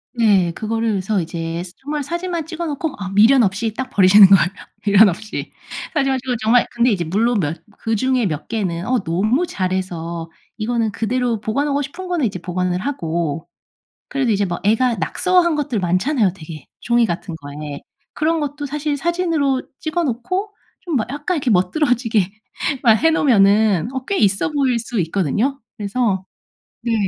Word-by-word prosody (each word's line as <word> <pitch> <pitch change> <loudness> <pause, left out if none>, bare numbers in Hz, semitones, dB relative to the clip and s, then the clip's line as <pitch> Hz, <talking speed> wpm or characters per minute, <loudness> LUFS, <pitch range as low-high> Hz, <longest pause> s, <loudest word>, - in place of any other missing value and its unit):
네. 200 -7 +3
그거를 225 +5 -2
그래서 200 +1 0
이제 165 0 -4
정말 295 +1 -4
사진만 345 +2 -3
찍어 335 +1 -5
놓고 300 0 -3
아 195 -1 -4
미련 220 +7 +5
없이 215 +2 0
딱 260 +3 -4
버리시는 200 -2 +7
거예요. 195 -2 +6 0.4
미련 205 +1 +7
없이. 215 +5 -5 0.4
사진만 270 -3 +1
찍고 255 -1 -2
정말 235 +3 +4
근데 240 +1 +2
이제 185 -5 0
물론 215 +7 +1
몇 160 -1 -3 0.2
그중에 235 +1 +1
몇 150 -3 -4
개는 185 -6 -2
어 250 0 +1
너무 215 - +1
잘해서 175 - -3 0.3
이거는 225 0 -1
그대로 235 +1 -1
보관하고 280 +6 0
싶은 340 +7 -7
거는 345 -8 +1
이제 190 - -5
보관을 180 +1 -2
하고 165 - -3 0.6
그래도 270 -5 0
이제 200 -1 +1
뭐 175 -2 -3
애가 225 +4 +2
낙서한 345 - +2
것들 280 -7 -1
많잖아요 190 - +1
되게 155 -5 -10
종이 235 0 +3
같은 170 -1 -4
거에. 145 -1 -8 0.3
그런 320 +2 0
것도 290 0 -4
사실 295 +1 -2
사진으로 325 -5 0 0.2
찍어 325 +2 -1
놓고 365 - -2 0.3
좀 340 -5 -3
뭐 220 - 0
약간 295 +6 -2
이렇게 270 -4 -1
멋들어지게 225 - +2 0.5
막 230 -3 +7
해 325 - +6
놓으면은 215 - +3
어 260 -1 -4
꽤 400 - -1
있어 195 +4 +2
보일 270 -5 +1
수 230 -1 -3
있거든요. 195 - 0 0.2
그래서 205 -2 -1 0.6
네. 235 -1 -1
225 Hz, 340 characters per minute, -20 LUFS, 185-275 Hz, 0.6 s, 버리시는